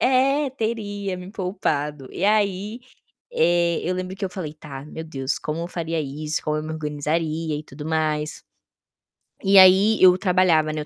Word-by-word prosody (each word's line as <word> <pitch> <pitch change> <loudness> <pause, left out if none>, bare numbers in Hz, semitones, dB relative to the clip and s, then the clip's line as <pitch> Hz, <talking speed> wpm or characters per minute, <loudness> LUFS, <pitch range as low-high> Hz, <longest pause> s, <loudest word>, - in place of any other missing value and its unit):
é, 270 +2 +3
teria 205 -5 -3
me 180 +1 -9
poupado", 150 - -2
e - - -3
aí, 205 +1 +1 0.5
eh, 175 - +2
eu 180 - -1
lembro 185 +1 -4
que 195 - -7
eu 190 - -1
falei: 175 -5 -6
"Tá, 145 -3 -9
meu 160 +1 -7
Deus, 135 -3 -3
como 155 +2 -4
eu 170 - -3
faria 165 -2 -3
isso? 150 +1 -3
Como 150 0 -1
eu 155 - -3
me 155 - -5
organizaria 155 +1 -2
e 150 - -7
tudo 150 0 -10
mais?". 155 -1 -1 1.0
E 195 0 +5
aí 190 +3 +7
eu 180 -1 +7
trabalhava, 180 -5 +3
né, 155 - -3
eu - - -7
170 Hz, 175 wpm, -23 LUFS, 155-195 Hz, 1.0 s, aí